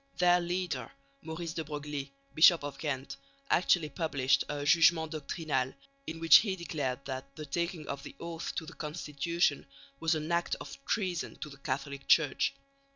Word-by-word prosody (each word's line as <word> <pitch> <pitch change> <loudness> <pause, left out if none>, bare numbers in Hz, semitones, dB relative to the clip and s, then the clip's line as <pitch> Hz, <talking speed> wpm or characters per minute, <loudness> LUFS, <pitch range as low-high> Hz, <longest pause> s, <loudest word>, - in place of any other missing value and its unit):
Their 180 0 +5
leader, 180 +5 -2 0.3
Maurice 160 0 -5
de 165 - -3
Broglie, 145 -2 -5 0.2
Bishop 165 0 +7
of 145 -1 -6
Ghent, 140 -3 -3 0.3
actually 175 -3 +3
published 140 -3 +1
a 145 -1 -3
jugement 165 -1 +5
doctrinal 150 -4 -2 0.3
in 165 - -5
which 165 0 +9
he 200 -4 0
declared 145 -7 -3
that 135 +1 -6
the 155 - -7
taking 170 +1 -3
of 140 - -4
the - - -10
oath 170 -1 -5
to 160 - -3
the - - -10
Constitution 150 -1 -1 0.3
was 165 0 +2
an 155 +2 -3
act 170 0 +1
of - - -10
treason 185 -7 -1
to 150 - -7
the 140 - -12
Catholic 140 0 -4
Church. 155 - +3
155 Hz, 160 wpm, -31 LUFS, 140-170 Hz, 0.3 s, which